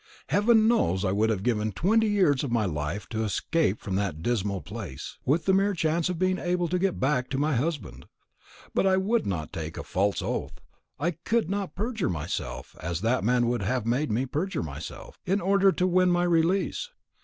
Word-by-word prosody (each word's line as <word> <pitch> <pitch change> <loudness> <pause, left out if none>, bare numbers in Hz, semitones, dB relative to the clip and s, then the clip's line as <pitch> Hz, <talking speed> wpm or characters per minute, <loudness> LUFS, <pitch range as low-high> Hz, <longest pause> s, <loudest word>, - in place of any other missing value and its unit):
Heaven 220 +1 +4
knows 95 - +2
I 95 - +1
would 105 +3 +2
have 100 -4 -1
given 110 -2 0
twenty 220 - +2
years 185 -10 +3
of 135 - -3
my 115 -3 +2
life 85 +4 -3
to 110 -1 -2
escape 110 - 0
from 100 - -5
that 90 -6 -2
dismal 100 -5 -1
place, 65 0 -8
with 155 +4 +2
the 190 - +3
mere 195 +1 +2
chance 165 +1 +1
of 180 - -2
being 185 +1 +1
able 175 0 0
to 180 +2 0
get 190 0 0
back 130 -2 +1
to 135 - -2
my 145 +1 +1
husband; 150 +4 -3 0.7
but - - +2
I 190 0 +4
would 215 +5 +1
not 85 -6 -3
take 80 0 -5
a - - -4
false 100 +2 0
oath; - - -3 0.4
I 165 +5 +1
could 185 +4 -1
not 200 -1 -3
perjure 220 0 -1
myself, 80 -2 -4
as 85 +2 -3
that 115 +2 +1
man 120 +2 +3
would 120 -1 0
have 120 +3 -1
made 125 +5 0
me 120 +5 +1
perjure 155 - -2
myself, 75 -1 -8
in 195 +3 +2
order 195 +1 +4
to 180 - 0
win 185 0 +3
my 175 0 +2
release. 175 - +1
145 Hz, 200 wpm, -27 LUFS, -, 0.7 s, Heaven